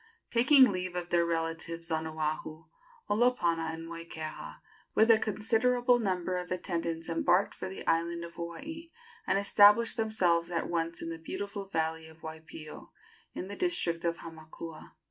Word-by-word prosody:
Taking 255 +1 +6
leave 180 -1 -3
of 175 -1 -3
their 170 -1 +3
relatives 165 0 -3
on 160 0 0
Oahu, 155 0 -3 0.4
Olopana 175 -8 +2
and 165 0 -7
Moikeha, 165 -2 -7 0.4
with 220 +1 +6
a 220 - +6
considerable 245 +4 +2
number 185 -4 -1
of 180 0 -5
attendants, 170 -2 -2
embarked 175 +3 +2
for - - -6
the 190 - -8
island 170 +1 +1
of 170 0 -8
Hawaii, 305 - -7 0.4
and 195 - +3
established 210 +4 +5
themselves 180 -7 +2
at 170 -2 -1
once 165 0 -2
in 165 - -4
the 165 - -6
beautiful 200 +4 -5
valley 160 -2 -1
of 160 +1 -17
Waipio, 160 -1 -9 0.4
in 185 - -4
the 200 - -6
district 180 - -1
of 170 0 0
Hamakua. 160 0 -10
170 Hz, 150 wpm, -30 LUFS, 165-205 Hz, 0.4 s, Taking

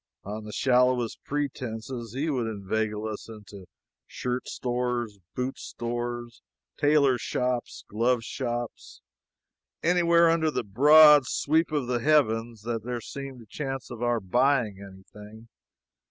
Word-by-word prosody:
On 105 +2 -6
the 105 - -7
shallowest 125 0 +1
pretenses 125 -5 -4
he 145 +4 -1
would 130 -7 -1
inveigle 105 +1 -2
us 110 +1 -7
into 105 -4 -11 0.4
shirt 125 0 -4
stores, 120 -4 -2 0.2
boot 125 +1 -3
stores, 120 0 -5 0.3
tailor 145 -4 +3
shops, 125 +1 -2
glove 115 +3 +1
shops 120 -2 -5 0.8
anywhere 170 0 +4
under 165 -1 +2
the 150 - -2
broad 145 +6 +7
sweep 160 +2 +1
of 145 -4 0
the 120 0 -1
heavens 115 -6 +1
that 115 -2 -3
there 120 0 -3
seemed 135 0 -8
a - - -18
chance 135 +1 -5
of 120 -1 -8
our 120 -1 +1
buying 120 0 +1
anything. 105 +3 -13
120 Hz, 125 wpm, -27 LUFS, 110-135 Hz, 0.8 s, broad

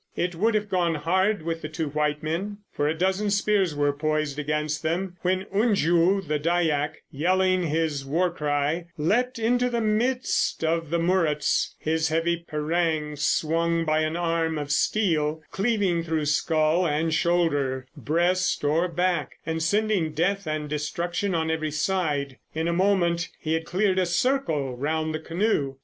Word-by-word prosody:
It 175 0 -1
would 215 +7 +1
have 210 0 0
gone 175 -4 +1
hard 185 +5 +1
with 165 0 -3
the 155 - -5
two 160 -1 -3
white 150 +1 -1
men, 185 +7 -3
for 145 - -1
a 155 - +1
dozen 190 +4 +1
spears 200 -4 +1
were 145 0 +1
poised 155 -1 -1
against 150 +1 -1
them, 175 +3 -2
when 185 +1 0
Unju, 195 -3 +2
the 150 0 0
Dyack, 155 -2 0
yelling 185 +5 +2
his 155 -2 -1
war 170 +6 0
cry, 150 +1 -1
leapt 240 +12 +1
into 245 +2 +1
the 235 -1 -1
midst 230 -1 0
of 165 -1 0
the 170 - +1
Muruts, 165 -3 +1
his 160 0 0
heavy 165 +2 +1
parang 155 -1 -1
swung 165 +3 +1
by 155 0 +2
an 155 +1 -1
arm 165 -2 0
of 145 -1 -4
steel, 160 -6 +1
cleaving 195 -5 +1
through 160 -2 -1
skull 155 +3 +2
and 155 +2 0
shoulder, 145 -6 +1
breast 170 +7 0
or 160 +5 +2
back, 175 -2 -1
and 160 0 -2
sending 200 -3 +1
death 195 +3 0
and 155 -1 -2
destruction 170 +6 -2
on 160 -1 0
every 155 -1 -1
side. 150 -4 -1 0.2
In 160 +1 -1
a 170 - +1
moment 175 -2 +1
he 160 -1 -2
had 160 0 -1
cleared 190 +1 +1
a 185 - +1
circle 175 - 0
round 155 +4 -1
the 155 - -2
canoe. 165 -5 -1
165 Hz, 160 wpm, -25 LUFS, 155-185 Hz, 0.2 s, Unju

